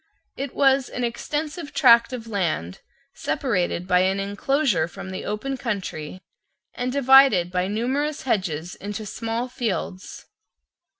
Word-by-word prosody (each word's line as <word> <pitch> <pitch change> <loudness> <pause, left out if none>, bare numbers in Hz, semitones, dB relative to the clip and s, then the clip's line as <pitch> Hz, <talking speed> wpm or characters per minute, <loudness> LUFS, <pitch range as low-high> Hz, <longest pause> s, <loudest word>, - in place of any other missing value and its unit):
It 275 -1 -5
was 270 -2 +3
an 250 - -4
extensive 295 +6 -4
tract 235 -3 +6
of 245 -3 -6
land 170 - -2 0.3
separated 180 -8 -1
by 180 -1 +4
an 190 +1 +2
enclosure 205 - +1
from 190 +1 -9
the 185 - -6
open 260 +6 -3
country, 185 - -5 0.5
and 250 +1 -2
divided 265 -9 +5
by 180 0 0
numerous 265 +8 -1
hedges 180 - -1
into 205 +1 -6
small 230 +3 -3
fields. 225 -6 -4
225 Hz, 125 wpm, -24 LUFS, 185-265 Hz, 0.5 s, tract